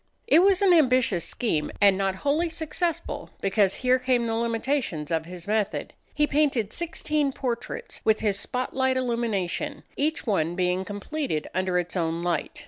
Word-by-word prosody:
It 340 -7 +6
was 390 0 +4
an 375 -2 +6
ambitious 255 - +3
scheme, 160 -11 -1
and 200 -1 +6
not 195 0 0
wholly 315 +4 +2
successful, 325 +1 -3
because 195 0 +2
here 255 +1 +4
came 255 -1 +1
in 230 - -2
the - - 0
limitations 230 - -1
of 160 -1 0
his 180 0 -9
method. 210 -1 -1 0.2
He 300 - +3
painted 280 -8 +1
sixteen 305 -4 -1
portraits 260 - -4
with 220 -1 +3
his 205 -2 +1
spot 250 +4 -3
light 260 0 +2
illumination, 235 +2 -2
each 310 +3 -1
one 175 -7 0
being 180 +1 0
completed 205 - -3
under 185 -1 0
its 175 +1 -2
own 165 -1 -1
light. 175 -1 -2
235 Hz, 165 wpm, -26 LUFS, 185-290 Hz, 0.2 s, It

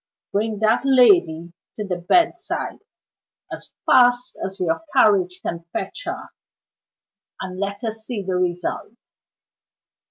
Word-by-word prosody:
Bring 215 +1 -1
that 220 +1 +3
lady 250 - +4 0.2
to 210 - -4
the 180 -2 -2
bedside 345 - 0 0.7
as - - -9
fast 245 0 +4
as 195 +1 -5
your 170 - -1
carriage 185 -6 +4
can 170 0 -4
fetch - - -5
her, - - -5 1.1
and 185 0 -6
let 200 +1 -4
us 225 -1 -3
see 220 -5 -3
the 185 0 -3
result. 180 +3 -2
200 Hz, 120 wpm, -22 LUFS, 180-245 Hz, 1.1 s, lady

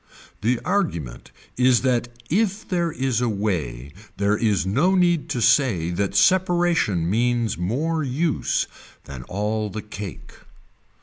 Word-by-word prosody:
The 115 +3 +1
argument 85 - -2 0.3
is 125 -1 +4
that 125 -2 +1 0.2
if 210 - 0
there 175 -2 0
is 130 -5 -1
a 120 - +1
way 75 - -3 0.2
there 100 +1 +2
is 105 -4 +1
no 140 - +2
need 175 -4 +2
to 120 - -2
say 100 - +3
that 100 +2 -2
separation 175 - +2
means 120 +2 +1
more 140 - -1
use 145 +4 0 0.4
than 70 -3 -9
all 105 +2 -2
the 105 +2 -6
cake. 105 -3 -8
115 Hz, 130 wpm, -23 LUFS, 100-160 Hz, 0.4 s, is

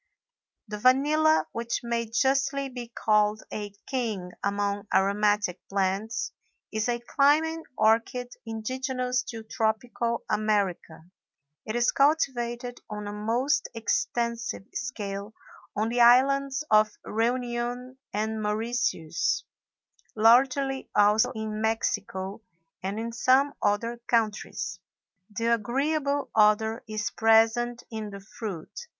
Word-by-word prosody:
The 210 0 -6
vanilla, 300 +6 +4
which 235 0 -3
may 235 -1 -1
justly 275 +3 +1
be 245 -2 -7
called 215 -2 +1
a 205 -1 -4
king 220 -9 -3
among 200 0 -1
aromatic 205 -1 +2
plants, 195 +4 -1 0.4
is 220 +2 -1
a 240 - +1
climbing 310 +6 +2 0.2
orchid 230 +3 +2
indigenous 250 +3 -2
to 225 -1 -6
tropical 230 +1 -1
America. 200 -6 -1 0.6
It 215 - -3
is 240 0 +3
cultivated 245 -4 +1
on 210 0 -5
a 205 - -5
most 235 +7 0
extensive 235 -1 -1
scale 210 -4 -5 0.4
on 215 +2 0
the 240 +1 +1
islands 270 +3 +5
of 215 0 +4
Reunion 245 +2 -2
and 220 +1 -2
Mauritius; 220 - -1 0.7
largely 265 +4 +3
also 210 +4 +4
in 215 -1 -4
Mexico, 205 -3 -2 0.4
and 195 +3 -3
in 230 +1 -3
some 260 +4 +3
other 230 +3 0
countries. 215 -5 -1 0.5
The 230 +3 0
agreeable 280 +5 0
odor 220 +1 +3
is 215 -1 -3
present 225 +2 +3
in 220 -2 -5
the 200 -1 -8
fruit. 200 - -7
230 Hz, 110 wpm, -27 LUFS, 210-250 Hz, 0.7 s, islands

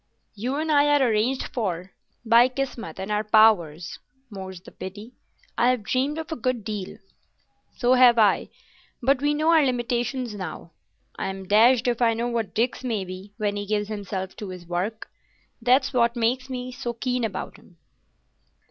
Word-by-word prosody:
You 245 +6 -3
and 310 +2 -1
I 290 -1 +5
are 290 -3 +4
arranged 230 +5 +1
for——" 185 -6 -3 0.3
"By 230 +2 +6
Kismet 250 - -5
and 190 +2 -4
our 210 - +2
own 215 - -28
powers, 175 -7 +3 0.3
more's 190 -2 -7
the 180 - -15
pity. 205 +5 -9 0.5
I 240 - +4
have 250 -4 0
dreamed 265 +7 0
of 320 0 -6
a - - -1
good 250 -3 -2
deal." 205 -3 -5 0.8
"So 245 0 +3
have 250 -2 +6
I, 210 -3 +3 0.5
but 270 +1 +3
we 295 +1 +2
know 310 +2 +1
our 320 -2 +5
limitations 245 -1 -1
now. 180 -4 -7 0.5
I'm 190 0 -4
dashed 230 +4 +5
if 240 0 0
I 230 -1 +3
know 235 +2 -1
what 225 -5 -3
Dick's 240 +3 0
may 220 -6 -2
be 185 +3 -10
when 205 -2 -1
he 205 0 -4
gives 210 0 -1
himself 195 -3 -5
to 205 - -6
his 180 -1 -9
work. 185 +6 -3 0.5
That's 250 +4 +3
what 235 -1 +2
makes 250 +3 0
me 255 -1 -5
so 240 -1 -4
keen 250 +1 -2
about 205 -4 -4
him." 175 - -21
230 Hz, 175 wpm, -25 LUFS, 200-255 Hz, 0.8 s, By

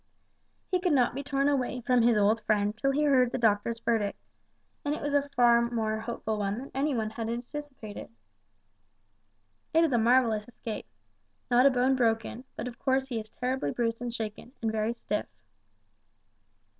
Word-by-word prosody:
He 365 - +2
could 355 -2 +1
not 250 -4 +3
be 275 - -4
torn 275 0 0
away 255 -3 0
from 250 0 +3
his 230 -1 +4
old 210 +2 +3
friend 210 0 +1
till 275 +5 0
he 285 +2 +1
heard 260 -4 +4
the - - -1
doctor's 225 0 +1
verdict, 225 -3 0 0.7
and 290 +1 0
it - - -6
was 290 0 -1
a 285 0 +2
far 235 -1 +5
more 220 -2 -1
hopeful 220 -1 -3
one 200 0 -1
than 270 +3 -8
anybody 265 -6 0
had 225 -1 -4
anticipated. 240 - -6 1.7
"It 330 - +6
is 315 -5 +2
a 240 - +4
marvellous 230 -2 +3
escape. 225 - -7 0.6
Not 250 +3 +6
a - - +7
bone 255 +1 +2
broken, 230 0 0
but 235 - -4
of 245 - -8
course 265 0 +1
he 235 -3 -2
is 215 0 -9
terribly 250 - -2
bruised 230 +7 -1
and 245 -1 -3
shaken, 225 +1 -6
and 225 -1 -1
very 220 +2 -1
stiff." 210 -2 -3
240 Hz, 175 wpm, -29 LUFS, 220-265 Hz, 1.7 s, a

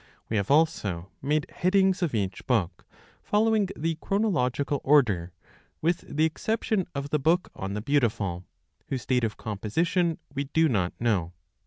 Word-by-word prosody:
We 110 - 0
have 100 -1 -1
also 105 - +1
made 150 +2 +1
headings 190 +1 +2
of 165 -9 0
each 95 -3 -3
book, 95 - 0 0.3
following 215 -1 +2
the 165 +1 -2
chronological 145 - 0
order, 105 - +3 0.5
with 170 +2 +1 0.2
the 155 - +5
exception 210 +3 -1
of 140 +1 -4
the 150 - +2
book 165 +6 +2
on 95 +1 -4
The 105 - -4
Beautiful, 110 -10 0 0.4
whose 130 -4 -4
date 125 -2 +1
of 110 -1 -1
composition 165 - 0 0.2
we 140 +1 -2
do 160 +4 +2
not 100 - 0
know. 95 -8 0
140 Hz, 150 wpm, -27 LUFS, 105-165 Hz, 0.5 s, the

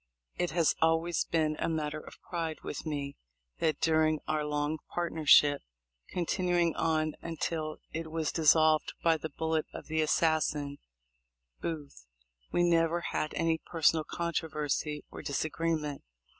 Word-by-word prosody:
It 175 -1 0
has 165 -2 +3
always 165 +1 +2
been 155 -2 +1
a - - 0
matter 155 -1 -2
of - - -12
pride 165 -3 -3
with 150 - -5
me 140 -2 -3 0.4
that 155 -3 +1
during 155 -1 +3
our 155 -1 0
long 150 +1 -1
partnership, 155 -4 +4 0.5
continuing 175 -1 +1
on 155 -1 +1
until 160 -1 -3
it 160 0 -4
was 160 -1 -1
dissolved 155 0 +4
by 165 -1 +4
the 160 +1 -5
bullet 160 +1 -1
of - - -7
the 160 0 0
assassin 155 -2 +1 0.8
Booth, 145 - -6 0.4
we 175 - +2
never 170 0 +3
had 155 - -1
any 165 -1 +1
personal 160 -1 +2
controversy 150 -3 -2
or - - -7
disagree 160 +3 -1
ment. 150 -2 -5
160 Hz, 135 wpm, -31 LUFS, 150-165 Hz, 0.8 s, partnership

